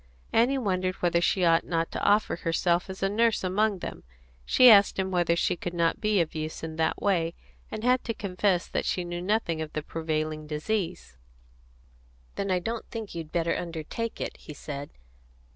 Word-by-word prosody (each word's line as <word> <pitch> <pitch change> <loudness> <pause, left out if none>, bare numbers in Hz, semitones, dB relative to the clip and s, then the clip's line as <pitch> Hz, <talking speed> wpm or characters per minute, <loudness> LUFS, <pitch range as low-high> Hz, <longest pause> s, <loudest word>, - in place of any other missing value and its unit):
Annie 245 +5 +4
wondered 185 -6 0
whether 170 -1 +1
she 180 +1 +2
ought 165 0 +4
not 165 -1 -1
to - - -4
offer 205 +1 +3
herself 170 +2 0
as 190 0 -6
a - - +4
nurse 225 +2 +2
among 200 +2 +1
them; - - -7 0.4
she 255 - +6
asked 205 -4 +7
him 190 0 -1
whether 175 -2 +2
she 170 - +1
could 175 0 -5
not 170 -1 +1
be 215 -2 +2
of 160 - -2
use 155 0 -5
in 160 -1 -5
that 160 - 0
way, 170 -4 +1 0.3
and 215 - -6
had 250 +1 +3
to 230 - -2
confess 185 -2 0
that - - -2
she 180 - 0
knew 175 0 -4
nothing 180 -4 0
about 155 -1 -6
the 155 - -3
prevailing 155 -1 -3
disease. 165 - -3 1.2
"Then, 200 - -3
I 185 - +3
don't 225 +6 -4
think 225 -3 -6
you'd 165 -2 -6
better 170 -1 0
undertake 170 +7 -4
it," - - -4
he 150 - -11
said. 140 0 -6
175 Hz, 190 wpm, -27 LUFS, 165-205 Hz, 1.2 s, asked